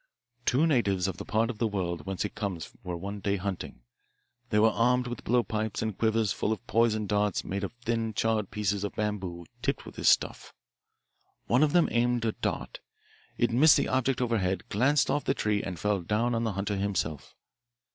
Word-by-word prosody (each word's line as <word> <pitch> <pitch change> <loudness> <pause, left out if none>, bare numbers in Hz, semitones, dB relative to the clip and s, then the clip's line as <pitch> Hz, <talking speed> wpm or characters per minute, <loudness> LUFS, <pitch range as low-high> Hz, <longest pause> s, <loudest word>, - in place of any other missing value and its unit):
Two 135 +6 +4
natives 100 - +2
of 95 -2 -4
the - - -7
part 115 +3 +1
of 110 - -12
the 115 - +2
world 90 -6 -3
whence 95 +1 -2
it 105 - -5
comes 100 -6 -4
were 90 -1 -4
one 100 +4 -5
day 100 0 0
hunting. 95 -9 -5 0.7
They 105 - +1
were 110 +1 +5
armed 125 +3 +2
with 120 -2 -6
blowpipes 110 -3 0
and 110 -3 -2
quivers 110 -1 +1
full 105 - -1
of 110 - -3
poisoned 110 -2 +2
darts 105 -1 +1
made 100 +1 -3
of 100 - -3
thin 115 -2 -2
charred 110 -3 0
pieces 100 -1 -1
of 100 - -4
bamboo 95 -5 -3 0.2
tipped 135 +1 -1
with - - -9
this - - +4
stuff. - - +1 0.9
One 125 +3 +3
of 155 -1 +3
them 175 -2 +5
aimed 120 0 +1
a 110 - +2
dart. - - -4 0.6
It 120 -1 +2
missed 140 +6 +6
the - - 0
object 130 0 +1
overhead, 95 -6 0
glanced 135 +7 +3
off 145 - 0
the 135 - +1
tree, 105 -1 0
and 90 -2 -5
fell 105 0 0
down 110 +7 0
on 115 0 0
the 110 - -1
hunter 100 +1 -2
himself. 95 -7 -2
105 Hz, 195 wpm, -28 LUFS, 100-120 Hz, 0.9 s, missed